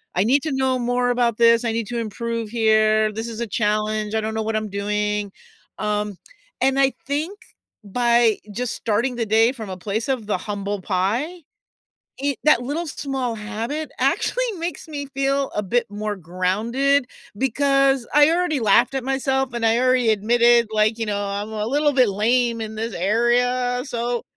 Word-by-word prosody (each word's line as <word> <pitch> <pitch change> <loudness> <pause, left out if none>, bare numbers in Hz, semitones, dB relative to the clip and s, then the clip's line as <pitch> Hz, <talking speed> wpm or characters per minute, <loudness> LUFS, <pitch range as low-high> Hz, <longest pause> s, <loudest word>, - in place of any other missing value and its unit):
"I 180 - +3
need 265 +7 +3
to 315 - -2
know 265 -1 +1
more 245 0 +1
about 240 -2 +1
this, 230 0 +4
I 230 - +1
need 225 -2 -2
to 240 -1 -2
improve 230 0 -4
here, 215 -1 +3
this 225 +2 -4
is 230 0 -6
a 235 - -2
challenge, 215 0 -1
I 220 - +1
don't 220 +1 -3
know 220 0 -2
what 220 0 -2
I'm 215 -1 -2
doing," 210 0 -2 0.5
um, 210 -1 -1 0.5
and 270 +1 +2
I 270 0 +4 0.2
think 310 +8 -2 0.5
by 235 +1 +2
just 245 +3 -3
starting 235 +4 -1
the 235 -1 -1
day 225 +3 +4
from 220 -6 -8
a 185 - -5
place 210 +6 -3
of 255 -5 -1
the 205 - 0
humble 205 0 -4
pie, 220 - -1 0.8
it 280 -1 -1
that 305 -5 +5
little 290 +7 -3
small 270 -4 -3
habit 230 +8 -4
actually - - +1
makes 335 -2 -5
me 285 -2 -5
feel 275 0 0
a 210 - 0
bit 240 +5 0
more 210 0 -4
grounded, 215 - 0 0.3
because 275 +1 +2
I 295 +1 +6
already 345 -4 +1
laughed 230 +4 +4
at 265 - -2
myself 265 -1 0
and 235 -1 -1
I 225 +1 +3
already 255 -2 +3
admitted, 235 +2 +4
like, 215 +1 +2
you 225 - -1
know, 205 -1 -1
"I'm 200 +1 -4
a 210 -1 -2
little 290 +3 +2
bit 255 -4 +4
lame 230 +4 +1
in 220 0 -5
this 225 +1 -4
area" 245 +5 +1
so, 240 -2 -2
235 Hz, 180 wpm, -22 LUFS, 215-265 Hz, 0.8 s, I